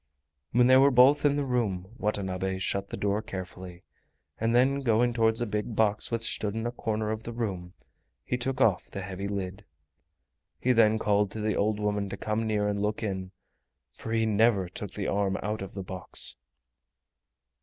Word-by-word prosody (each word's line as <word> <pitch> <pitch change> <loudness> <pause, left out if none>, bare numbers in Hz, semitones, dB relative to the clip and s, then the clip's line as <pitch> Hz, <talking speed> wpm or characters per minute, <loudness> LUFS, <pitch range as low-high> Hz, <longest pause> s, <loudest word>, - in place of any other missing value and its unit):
When 120 +1 +4
they 130 +1 +7
were 135 +1 +6
both 135 +3 +5
in 145 -1 +4
the 145 -1 -1
room 110 -8 -1
Watanabe 95 -2 -1
shut 100 +1 -2
the - - -6
door 100 +1 0
carefully, 95 -4 -8 0.6
and 115 +1 +1
then 135 +3 +4
going 120 -2 +2
towards 115 0 +2
a - - +1
big 105 +1 -3
box 105 -2 +1
which 115 -1 -2
stood 110 -2 -1
in 115 +1 -3
a 120 - -1
corner 110 -3 -2
of 110 0 -3
the 115 - -7
room, 95 -7 -4 0.5
he - - -1
took 125 +1 -2
off 110 -8 +3
the 100 - -6
heavy 95 +1 -5
lid. 100 0 -4 1.0
He 125 - +2
then 110 -2 +4
called 105 -2 +2
to 110 - -5
the 105 0 0
old 105 +1 +1
woman 105 -1 -1
to - - -5
come 110 +1 -2
near 105 -1 +1
and 100 -1 -1
look 105 +2 -1
in, 95 -3 -3 0.7
for 110 - -7
he 115 0 +2
never 110 -3 +3
took 95 +3 -6
the 100 - -5
arm 100 -1 0
out 105 +1 -2
of 95 - -7
the 95 - -4
box. 90 -1 0
105 Hz, 190 wpm, -28 LUFS, 100-115 Hz, 1.0 s, they